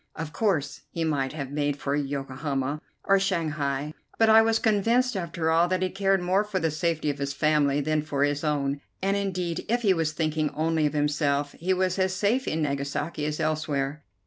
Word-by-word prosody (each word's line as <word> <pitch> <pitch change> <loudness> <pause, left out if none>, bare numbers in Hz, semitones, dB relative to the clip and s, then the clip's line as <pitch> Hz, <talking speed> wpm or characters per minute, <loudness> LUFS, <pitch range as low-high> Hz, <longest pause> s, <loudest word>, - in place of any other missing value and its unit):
Of 155 -1 -6
course, 145 -9 0
he 165 - -3
might 145 -4 0
have 140 -4 -5
made 145 -1 -1
for 140 0 -1
Yokohama 140 0 -2 0.2
or 195 0 +4
Shanghai, 150 -6 -1 0.2
but 225 -1 +4
I 220 0 +8
was 225 0 +3
convinced, 230 +3 +2
after 170 -3 -1
all, 165 +2 +4
that 185 +1 0
he 185 - -1
cared 195 -1 +1
more 185 +3 +2
for 210 -2 -3
the 165 -2 0
safety 155 -1 0
of 140 - -9
his 140 0 -2
family 145 -1 +2
than 155 +1 +1
for 145 -2 -1
his 145 +1 0
own, 140 -2 0 0.2
and 195 +1 +2
indeed, 180 -4 -2
if 240 +1 +1
he 200 -3 +5
was 165 -3 0
thinking 155 -1 0
only 160 0 +1
of 150 - -4
himself, 145 -1 +1
he 180 +4 -3
was 185 0 0
as 185 0 +1
safe 215 +7 +1
in 160 0 0
Nagasaki 145 +2 -2
as 150 0 -3
elsewhere. 150 -2 -1
155 Hz, 200 wpm, -26 LUFS, 145-185 Hz, 0.2 s, I